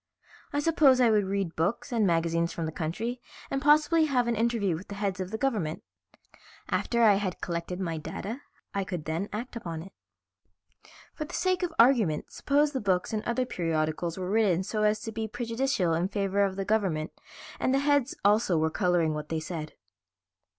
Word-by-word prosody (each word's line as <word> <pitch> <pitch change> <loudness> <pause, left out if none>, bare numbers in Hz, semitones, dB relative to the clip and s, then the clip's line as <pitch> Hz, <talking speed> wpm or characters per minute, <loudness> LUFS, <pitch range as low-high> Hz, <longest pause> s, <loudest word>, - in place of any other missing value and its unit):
"I 290 - 0
suppose 290 -5 +4
I 240 -3 +5
would 210 -2 +3
read 195 -3 -2
books 200 - -1
and 225 -4 +2
magazines 170 0 +1
from 165 - -3
the 160 - -3
country 215 +11 -3 0.3
and 270 - -1
possibly 305 +2 +4
have 255 -5 +1
an 235 - +1
interview 225 -5 +1
with 175 +5 -8
the 200 - -7
heads 200 -2 -2
of 185 -1 -3
the 220 - -3
government. 215 - -1 0.9
After 235 -1 +1
I 210 -3 +6
had 185 -3 -3
collected 170 +1 -4
my 165 -4 -2
data 215 - -6 0.3
I 200 - 0
could 180 -5 -5
then 165 +6 -2
act 235 +5 -5
upon 165 -8 -5
it." 195 - -13 1.2
"For 305 - -5
the - - -7
sake 370 0 +1
of 355 -2 -1
argument 230 - +3
suppose 290 +1 +2
the 265 - -3
books 190 0 0
and 215 - 0
other 250 +2 0
periodicals 165 -4 -1
were 185 0 -3
written 200 -5 +3
so 215 +2 -2
as 210 0 +2
to 225 - -5
be 220 0 -3
prejudicial 230 -5 -1
in 170 +3 +1
favor 200 0 0
of 195 -1 0
the 195 0 -3
government, 185 -7 0 0.5
and - - +1
the 270 - +3
heads 280 -2 +2
also 205 -4 +4
were 160 0 +1
coloring 175 -4 +1
what 150 0 -5
they 160 - -1
said." 155 -1 -6
200 Hz, 190 wpm, -28 LUFS, 170-240 Hz, 1.2 s, I